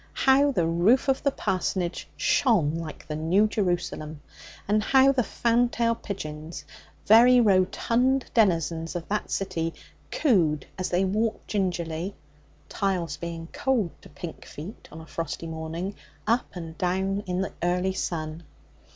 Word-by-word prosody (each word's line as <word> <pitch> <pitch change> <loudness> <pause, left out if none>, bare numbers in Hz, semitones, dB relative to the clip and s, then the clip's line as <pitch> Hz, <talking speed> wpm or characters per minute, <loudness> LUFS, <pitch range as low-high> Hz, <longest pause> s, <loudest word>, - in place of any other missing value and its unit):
How 275 +2 +5
the 175 -11 +1
roof 175 +12 +3
of 265 - +2
the 280 - +2
parsonage 185 -7 -2
shone 220 - +3
like 165 -2 -6
the 155 - -3
New 170 +7 +3
Jerusalem! 175 -7 -2 0.5
And 210 +1 +3
how 265 +3 +5
the 265 -2 +2
fantail 235 0 +1
pigeons, 155 -7 -7 0.4
very 245 +4 +7
rotund 235 +6 +2
denizens 165 - +1
of 170 -1 -4
that 210 +1 -1
city, 165 -4 -2 0.3
cooed 165 - +2
as 185 - -3
they 180 +2 +2
walked 215 +4 -1
gingerly 180 -2 -2 0.5
tiles 180 -7 -1
being 165 -1 -6
cold 240 - 0
to - - -14
pink 155 +3 -8
feet 170 +9 -10
on 160 - -9
a - - -11
frosty 165 0 -5
morning 165 +4 -4 0.3
up 230 +2 +1
and 165 -2 -7
down 190 +2 0
in 180 +1 -1
the 190 - -3
early 180 +2 +1
sun! 160 -3 -3
185 Hz, 140 wpm, -26 LUFS, 165-225 Hz, 0.5 s, very